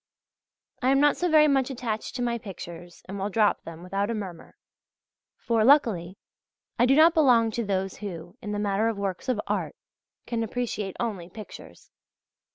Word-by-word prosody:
I 255 - +2
am 275 0 +4
not 290 0 +4
so 355 - 0
very 305 -1 +6
much 270 -2 +2
attached 235 -4 -4
to 250 - -2
my 235 -1 -1
pictures, 175 -4 -10
and 195 +1 -6
will 195 +2 -2
drop 210 0 +2
them 165 +1 -10
without 195 +3 -2
a 230 - -1
murmur; 190 -5 -8 0.8
for, 230 -2 +1
luckily, 215 - +3 0.6
I 245 - +5
do 270 - +5
not 320 +2 +7
belong 245 -8 +4
to 235 +2 -2
those 195 -2 -2
who, 175 -3 -7
in 210 - -5
the 205 - -2
matter 205 +1 +1
of 225 -2 -1
works 200 +4 -3
of 245 -4 +1
art, - - -2 0.5
can 235 -1 -2
appreciate 220 -4 -3
only 200 -8 -3
pictures. 215 +3 -12
215 Hz, 175 wpm, -26 LUFS, 195-245 Hz, 0.8 s, not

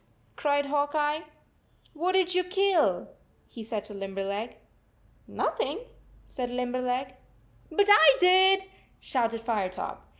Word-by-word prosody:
cried 285 -1 0
Hawk 290 +1 -1
Eye. 300 0 +1 0.7
44 310 - -16
What 365 +2 +1
did 370 -1 +2
you 365 0 +2
kill?" 385 +1 +1 0.4
he 230 - -11
said 215 -2 -4
to 210 - -10
Lim 195 -1 -7
berleg. 200 +4 -4 0.4
" - - -38 0.2
Nothing," 480 - -2 0.5
said 250 -2 -5
Limberleg. 250 +1 -2 0.6
4< - - -13
But 405 0 +4
I 320 -9 +8
did," 380 +1 +5 0.4
shouted 230 -3 -2
Firetop. 210 -6 -3
280 Hz, 135 wpm, -27 LUFS, 230-365 Hz, 0.7 s, I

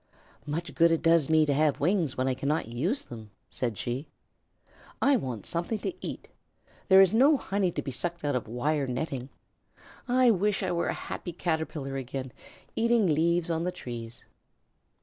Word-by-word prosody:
"Much 165 +3 -3
good 170 0 +4
it 165 - +1
does 165 -3 +4
me 155 -1 +5
to 145 - +1
have 150 0 +2
wings 170 -3 +1
when 130 +1 0
I 130 - +2
cannot 140 +1 -1
use 155 - -1
them," 110 -3 -10 0.2
said 120 -5 -2
she. 125 +5 -3 0.9
"I 280 - +4
want 125 - -3
something 170 +6 -2
to 280 - -3
eat. - - -6 0.6
There 190 -1 +8
is 190 0 +5
no 275 +6 +5
honey 195 -5 0
to - - -4
be 135 - -4
sucked 170 +5 -4
out 145 -2 +1
of 125 - -2
wire 140 +5 -1
netting. 130 0 -3 0.8
I 250 -1 +5
wish 205 0 +1
I 185 - 0
were 170 -1 0
a - - 0
happy 175 - -6
Caterpillar 160 -5 -2
again, 130 0 -5 0.4
eating 230 -1 +3
leaves 170 +1 +2
on 165 0 -1
the 180 - -1
trees." 120 -5 -8
160 Hz, 175 wpm, -28 LUFS, 130-180 Hz, 0.9 s, There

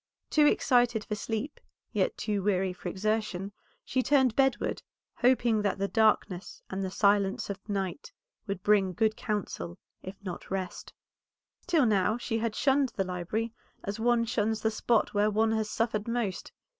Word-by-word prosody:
Too 300 -1 +5
excited 245 -6 +3
for - - -3
sleep, 225 +6 -3 0.3
yet - - 0
too 210 -2 -1
weary 190 -2 +1
for 180 0 -6
exertion, 200 0 -1 0.3
she 260 - +1
turned 265 -4 +3
bedward, 270 -3 +1 0.4
hoping 240 -3 +3
that 200 -2 0
the 200 0 0
darkness 210 -4 +1
and 190 +1 -2
the 190 - -2
silence 200 0 +2
of 200 +2 -10
night 195 - -3 0.4
would 195 -2 -4
bring 200 -3 +3
good 220 +2 +1
counsel, 180 - -4 0.2
if 190 +1 -8
not 180 -3 -6
rest. 190 -1 -4 0.8
Till 330 -6 +4
now 215 0 +2
she 230 -2 -2
had 225 -1 -2
shunned 270 0 +3
the 195 - +1
library 185 +5 -3 0.3
as 200 +2 -4
one 235 0 +3
shuns 220 -1 0
the 220 - +1
spot 220 +1 +1
where 205 +1 +3
one 220 +1 +2
has 220 -1 0
suffered 220 -2 -1
most. 230 -5 -2
215 Hz, 160 wpm, -29 LUFS, 195-230 Hz, 0.8 s, Too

